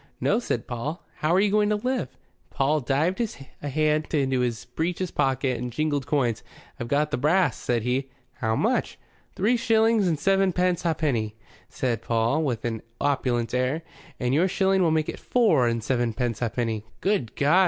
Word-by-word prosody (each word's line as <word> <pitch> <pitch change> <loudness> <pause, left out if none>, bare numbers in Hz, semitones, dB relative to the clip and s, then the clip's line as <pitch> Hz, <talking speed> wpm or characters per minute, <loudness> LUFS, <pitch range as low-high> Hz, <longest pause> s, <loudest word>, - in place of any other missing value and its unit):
"No," 225 - +2
said 120 - -2
Paul. 135 +8 -5
"How 155 - 0
are - - +5
you 205 0 +3
going 210 0 +3
to 210 - +2
live?" 250 - -1 0.4
Paul 145 +3 +1
dived 150 - 0 0.4
a 145 - -3
hand 155 +2 +1
into 135 -3 +1
his 120 -2 -1
breeches 170 +7 -2
pocket 135 -2 0
and 125 0 -4
jingled 145 0 -1
coins. 130 -6 +1 0.4
"I've 120 - -4
got 150 +4 +1
th' 145 - -2
brass," 155 -2 +3
said 120 -2 -1
he. 130 +2 -1 0.3
"How 110 -3 0
much?" - - 0 0.4
"Three 225 +6 +2
shillings 225 -3 +3
and 165 -3 +1
sevenpence 185 0 +2
ha'penny," 140 -10 0 0.3
said 120 -3 -2
Paul, 115 +7 +1
with 125 -7 -2
an 115 -2 -2 0.2
opulent 125 -5 0
air. 130 +6 0 0.4
"And 125 0 0
yo'r 165 +6 +4
shilling 190 0 +2
will 170 - +4
make 155 -1 +1
it - - -5
four 200 - +3
and 115 -1 -1
sevenpence 120 -2 -1
ha'penny." 115 -2 -1 0.2
"Good 190 - 0
God!" 145 +1 +2
145 Hz, 175 wpm, -25 LUFS, 120-180 Hz, 0.4 s, are